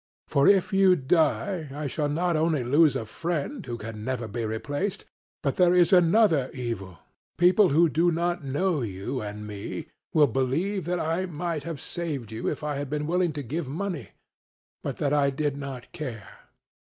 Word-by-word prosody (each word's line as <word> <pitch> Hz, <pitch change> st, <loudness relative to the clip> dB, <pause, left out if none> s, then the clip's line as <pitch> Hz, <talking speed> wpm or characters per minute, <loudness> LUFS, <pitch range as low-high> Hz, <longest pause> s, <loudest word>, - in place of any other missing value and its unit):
For 140 Hz, 0 st, +3 dB
if 200 Hz, +1 st, +4 dB
you 195 Hz, -1 st, +6 dB
die 160 Hz, +3 st, +1 dB
I 145 Hz, +2 st, -5 dB
shall 145 Hz, +2 st, -1 dB
not 170 Hz, +3 st, 0 dB
only 155 Hz, -3 st, +1 dB
lose 145 Hz, +5 st, +4 dB
a 110 Hz, -, -2 dB
friend 170 Hz, -, -3 dB
who 120 Hz, -2 st, -5 dB
can 110 Hz, -1 st, -7 dB
never 125 Hz, -2 st, -2 dB
be 115 Hz, +2 st, -4 dB
replaced, 145 Hz, -, -3 dB, 0.4 s
but 140 Hz, -3 st, 0 dB
there 180 Hz, -1 st, +5 dB
is 175 Hz, 0 st, +5 dB
another 175 Hz, -, +4 dB
evil: 110 Hz, -8 st, -5 dB, 0.4 s
people 185 Hz, +3 st, +5 dB
who 165 Hz, +4 st, +5 dB
do 165 Hz, +3 st, +2 dB
not 175 Hz, 0 st, -1 dB
know 150 Hz, +4 st, 0 dB
you 110 Hz, +4 st, -4 dB
and 105 Hz, 0 st, -6 dB
me 105 Hz, -1 st, -6 dB, 0.2 s
will 155 Hz, -2 st, +5 dB
believe 145 Hz, -, -1 dB
that 175 Hz, +1 st, -1 dB
I 165 Hz, +4 st, -1 dB
might 165 Hz, -1 st, -3 dB
have 165 Hz, -4 st, -5 dB
saved 145 Hz, -11 st, -4 dB
you 110 Hz, +1 st, -4 dB
if -, -, -5 dB
I 150 Hz, -2 st, -2 dB
had 140 Hz, -1 st, -4 dB
been 150 Hz, +1 st, -2 dB
willing 175 Hz, +1 st, +1 dB
to 145 Hz, -1 st, -4 dB
give 145 Hz, +3 st, -4 dB
money, 160 Hz, -, -4 dB, 0.7 s
but -, -, -4 dB
that 145 Hz, -1 st, 0 dB
I 145 Hz, -1 st, +3 dB
did 145 Hz, +1 st, -1 dB
not 135 Hz, -3 st, -7 dB
care. 125 Hz, -11 st, -6 dB
150 Hz, 180 wpm, -26 LUFS, 130-175 Hz, 0.7 s, you